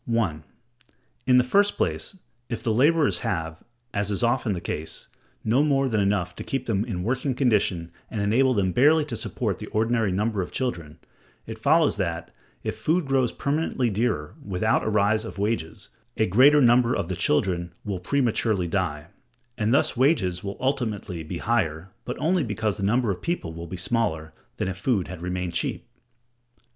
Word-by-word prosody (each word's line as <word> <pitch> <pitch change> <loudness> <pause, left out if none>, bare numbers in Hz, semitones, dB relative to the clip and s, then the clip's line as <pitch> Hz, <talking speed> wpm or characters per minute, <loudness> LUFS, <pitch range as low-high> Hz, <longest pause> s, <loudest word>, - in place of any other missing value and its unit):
(1.) 105 -10 0 0.8
In 125 -1 +6
the 125 - +6
first 200 +11 +2
place, 195 - -1 0.3
if 115 -3 -4
the 115 -3 +1
laborers 150 +5 +3
have, 80 -8 -3 0.3
as 100 0 0
is 100 +2 -1
often 120 -2 +1
the 90 - -3
case, 80 -1 -5 0.3
no 120 +5 +3
more 135 -2 +2
than 110 -4 +1
enough 100 -4 0
to - - -6
keep 135 - -3
them 105 -3 0
in 95 -7 -4
working 130 +4 -1
condition 100 -10 +1 0.2
and 110 - -4
enable 120 +6 +3
them 95 -3 +1
barely 150 - +4
to 125 - -5
support - - -3
the - - -7
ordinary 110 -1 +1
number 105 +2 0
of 90 - -5
children, 85 - -3 0.5
it 110 0 -8
follows 155 +4 +3
that, 85 -4 -3 0.3
if - - -3
food 165 +1 0
grows 135 -3 +1
permanently 140 -5 -1
dearer 105 -8 -1
without 100 +3 +1
a - - 0
rise 105 +1 +2
of 110 - -8
wages, 100 -2 -2 0.3
a 110 - +3
greater 135 +10 +6
number 120 0 +4
of - - -2
the 90 - -3
children 85 +2 0
will 100 -3 -3
prematurely 110 -3 0
die; 80 -5 -2 0.5
and 110 -1 0
thus 140 +1 +2
wages 115 - +2
will 100 0 -5
ultimately 110 -9 -2
be 80 +3 -5
higher, 95 -5 -1
but - - -4
only 175 +1 +1
because 110 -2 -1
the - - -6
number 110 +3 +2
of 90 - -5
people 170 - -3
will 85 +1 -7
be 95 - -6
smaller, 85 -6 -1 0.2
than - - -1
if 95 -1 -4
food 100 -2 0
had 90 -2 -7
remained 90 0 -3
cheap. 85 - -2
110 Hz, 180 wpm, -25 LUFS, 90-125 Hz, 0.8 s, In